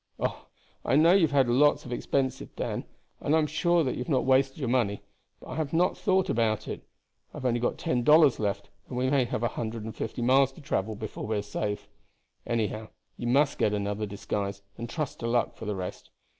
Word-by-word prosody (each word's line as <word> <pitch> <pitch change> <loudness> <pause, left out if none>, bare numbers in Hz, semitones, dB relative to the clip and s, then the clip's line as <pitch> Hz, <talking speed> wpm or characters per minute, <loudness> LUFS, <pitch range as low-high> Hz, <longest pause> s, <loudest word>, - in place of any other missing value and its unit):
"Oh, - - -3 0.4
I - - +2
know 165 +4 +6
you 195 - +5
have - - -11
had - - -6
lots 140 +5 +3
of 125 - -5
expenses, 130 +1 -1
Dan, - - -3 0.3
and 150 - +1
I - - +5
am 155 - +3
sure 170 +2 +2
that 130 - 0
you - - -5
have 125 - -4
not 135 -4 +2
wasted 135 0 +3
your 135 -5 -2
money; 115 -5 +1 0.4
but - - -13
I 130 - -5
had 155 -2 -2
not 175 +3 +3
thought 190 -1 +2
about 110 -2 0
it. - - -5 0.5
I - - -6
have - - -6
only 120 -1 +2
got 120 - -1
ten 125 - 0
dollars 150 0 +6
left, 100 -1 -2 0.2
and 125 - -5
we 130 +1 +1
may 135 -3 +3
have 115 -1 -3
a - - +3
hundred 115 -1 -4
and 110 -1 -6
fifty 115 +2 -4
miles 135 +2 +4
to 160 - -13
travel 110 -7 -2
before 105 0 -6
we 110 -1 0
are 100 - -2
safe. 105 0 -3 0.6
Anyhow, 110 -1 -1 0.3
you 120 - -4
must 140 +3 +3
get 105 - +2
another 105 +1 -2
disguise, 100 0 -4
and 115 0 -6
trust 150 -2 -4
to 115 - -3
luck 120 0 +1
for 110 - -8
the 105 -1 -2
rest. 90 -1 -6
120 Hz, 230 wpm, -28 LUFS, 110-140 Hz, 0.6 s, know